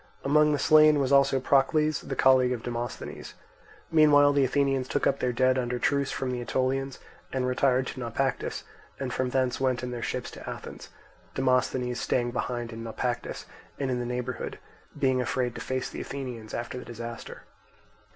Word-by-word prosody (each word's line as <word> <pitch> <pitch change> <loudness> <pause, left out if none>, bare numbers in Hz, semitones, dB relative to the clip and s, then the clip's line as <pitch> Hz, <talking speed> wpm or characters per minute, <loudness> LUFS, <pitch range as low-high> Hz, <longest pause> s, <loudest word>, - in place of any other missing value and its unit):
Among 150 +2 +4
the 145 - +2
slain 155 +1 +6
was 135 -1 0
also 140 -1 +4
Procles, 145 +3 +2
the - - -5
colleague 130 -1 +4
of 120 - -5
Demosthenes. 120 0 -5 0.6
Meanwhile 145 -2 +6
the 140 -1 +3
Athenians 135 -1 +1
took - - -1
up 140 - +2
their 125 - 0
dead 130 +1 +2
under 125 0 -2
truce 140 +2 +1
from 130 -1 -2
the 125 -1 -3
Aetolians, 130 +2 -1 0.3
and 130 -1 -1
retired 130 0 +2
to - - -6
Naupactus, 125 +2 -2 0.4
and 130 -2 -3
from 130 -1 -1
thence 130 -1 0
went 130 -2 +1
in 125 - -3
their 120 -1 -5
ships - - -3
to - - -9
Athens; - - -8 0.5
Demosthenes 130 -1 +1
staying 120 -2 0
behind 120 -1 -3
in 115 - -7
Naupactus 120 +1 -3 0.3
and 135 -2 -1
in 125 - -1
the 120 - -3
neighbourhood, 125 +1 -4 0.4
being 130 -1 +2
afraid 125 -1 -1
to - - -7
face 130 -1 -2
the - - -6
Athenians 125 -6 -6
after 120 +2 -4
the - - -10
disaster. 115 0 -8
130 Hz, 175 wpm, -27 LUFS, 125-135 Hz, 0.6 s, slain